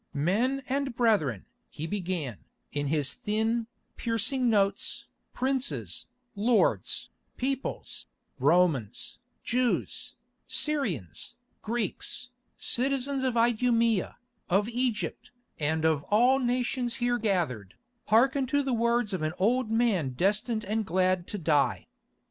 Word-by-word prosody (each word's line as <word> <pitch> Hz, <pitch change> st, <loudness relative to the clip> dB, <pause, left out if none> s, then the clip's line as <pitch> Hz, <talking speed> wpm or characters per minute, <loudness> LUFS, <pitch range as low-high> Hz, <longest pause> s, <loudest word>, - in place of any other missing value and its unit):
"Men 225 Hz, -, +1 dB
and 270 Hz, -1 st, -1 dB
brethren," 195 Hz, -, +2 dB, 0.2 s
he 155 Hz, -, -6 dB
began, 175 Hz, -, -3 dB, 0.3 s
in 145 Hz, 0 st, -1 dB
his 145 Hz, -3 st, 0 dB
thin, 220 Hz, -, -1 dB, 0.3 s
piercing 235 Hz, +3 st, +1 dB
notes, 200 Hz, -3 st, +1 dB, 0.3 s
"princes, 245 Hz, -, -2 dB, 0.3 s
lords, 225 Hz, +3 st, +1 dB, 0.3 s
peoples, 265 Hz, +1 st, -3 dB, 0.3 s
Romans, 145 Hz, -, +2 dB, 0.2 s
Jews, 245 Hz, 0 st, 0 dB, 0.3 s
Syrians, 205 Hz, -, -1 dB, 0.3 s
Greeks, 240 Hz, +2 st, -3 dB, 0.3 s
citizens 270 Hz, +1 st, 0 dB
of 255 Hz, -2 st, 0 dB
Idumæa, 230 Hz, -2 st, +2 dB, 0.3 s
of 195 Hz, +3 st, +3 dB
Egypt, 235 Hz, -2 st, -2 dB, 0.3 s
and 160 Hz, +1 st, 0 dB
of 160 Hz, -3 st, +3 dB
all 245 Hz, +6 st, +4 dB
nations 245 Hz, -1 st, 0 dB
here 245 Hz, 0 st, +1 dB
gathered, 165 Hz, -, -1 dB, 0.3 s
hearken 265 Hz, +4 st, +4 dB
to 285 Hz, +3 st, +2 dB
the 265 Hz, -2 st, -1 dB
words 235 Hz, -2 st, +1 dB
of 185 Hz, -, -2 dB
an 155 Hz, +1 st, -1 dB
old 235 Hz, +5 st, +2 dB
man 220 Hz, -, +1 dB
destined 210 Hz, -, +1 dB
and 220 Hz, +2 st, 0 dB
glad 185 Hz, -1 st, +1 dB
to 210 Hz, -, -4 dB
die. 150 Hz, -5 st, +2 dB
220 Hz, 110 wpm, -28 LUFS, 175-245 Hz, 0.3 s, all